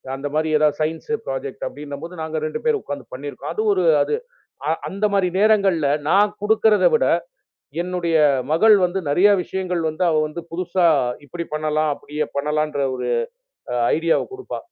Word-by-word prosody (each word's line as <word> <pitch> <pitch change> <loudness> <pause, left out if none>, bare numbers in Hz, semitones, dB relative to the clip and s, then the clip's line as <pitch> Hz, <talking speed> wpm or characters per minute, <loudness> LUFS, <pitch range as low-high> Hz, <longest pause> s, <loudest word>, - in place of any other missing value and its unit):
அந்த 135 +2 -4
மாதிரி 155 0 +1
எதாவது 150 -1 +2
சயின்ஸ் 160 +6 -3 0.2
ப்ராஜெக்ட். 140 +2 -5
அப்படின்னு 170 +1 -8
நாங்க 160 0 -3
2 155 - -4
பேரும் 455 -3 +2
உக்காந்து 140 -3 -6
பண்ணி 145 +3 -6
இருக்கோம். - - -7
அது 435 - -1
ஒரு 375 - +1 0.2
அது. 445 - -1 0.7
அந்த 200 +2 -1
மாரி 195 -2 +3
நேரங்கள்ல 195 -8 +3 0.2
நான் 200 +5 +4
குடுக்குறத 215 0 +3
விட 465 +2 +3 0.8
என்னுடைய 175 -2 0 0.3
மகள் 210 +7 +6
வந்து 180 +2 -2
நெறைய 180 +8 +4
விஷயங்கள் 180 -2 -3
வந்து 155 +3 -2
அவ 160 - +2
வந்து 155 +3 -7
புதுசா 180 +1 0 0.4
இப்படி 170 +5 -5
பண்ணலாம், 155 0 0
அப்படியே 150 +2 -4
பண்ணலாம் 150 +2 0
என்ற 145 -1 -1
ஒரு - - -4 0.9
ஐடியா 165 +1 +2 0.2
கொடுப்பா. 395 0 -6
165 Hz, 155 wpm, -21 LUFS, 150-195 Hz, 0.9 s, மகள்